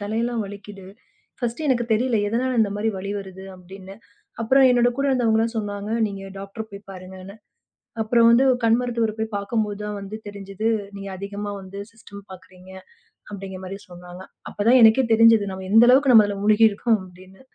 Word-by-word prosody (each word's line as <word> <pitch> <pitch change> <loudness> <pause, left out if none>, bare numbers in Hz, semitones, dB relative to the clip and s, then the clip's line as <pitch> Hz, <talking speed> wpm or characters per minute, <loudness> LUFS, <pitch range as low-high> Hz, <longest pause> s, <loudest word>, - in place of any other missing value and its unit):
தலையெல்லாம் 225 +2 -2
வலிக்குது. 200 -1 -11 0.5
ஃபர்ஸ்ட்டு 240 +5 -4
எனக்குத் 240 -3 0
தெரியல 235 +1 +1
எதனால 250 +2 -1
இந்த 205 -2 +1
மாரி 215 +2 -1
வலி 200 +1 -6
வருது 190 -1 -10
அப்படின்னு. 190 +1 -12 0.5
அப்புறம் 260 +4 +4
என்னோட 245 0 +3
கூட 275 - -1
இருந்தவங்க 230 -4 +1
எல்லாம் 230 +1 -1
சொன்னாங்க 205 -1 -4 0.2
நீங்க 195 -1 -7 0.2
டாக்டர் 210 +3 -8
போய் 200 0 -12
பாருங்கன்னு. 185 +1 -11 0.7
அப்புறம் 230 +1 +3
வந்து 235 +3 +5
ஒரு 250 - 0
கண் 230 +1 +4
மருத்துவர் 230 -3 -2
போய் 220 0 -4
பார்க்கும்போது 205 0 -3
தான் 210 0 -5
வந்து 200 +2 -8
தெரிஞ்சுது 200 +1 -5 0.3
நீங்க 195 0 -8
அதிகமா 200 +1 -6
வந்து 190 +1 -10
சிஸ்டம் 200 -3 -14
பார்க்குறீங்க 185 0 -15 0.6
அப்படிங்கற 190 -2 -8
மாரி 195 +1 -7
சொன்னாங்க. 180 +1 -11 0.3
அப்பதான் 235 +5 +3
எனக்கே 225 +4 +6
தெரிஞ்சுது 225 -3 +5
நாம 190 0 -8
எந்த 225 +3 +6
அளவுக்கு 265 +1 +5
நம்ம 220 -3 +7
அதுல 200 -1 -5
மூழ்கி 215 +1 +5
இருக்கோம் 215 +1 0
அப்படின்னு. 185 +1 -17
210 Hz, 170 wpm, -22 LUFS, 195-230 Hz, 0.7 s, நம்ம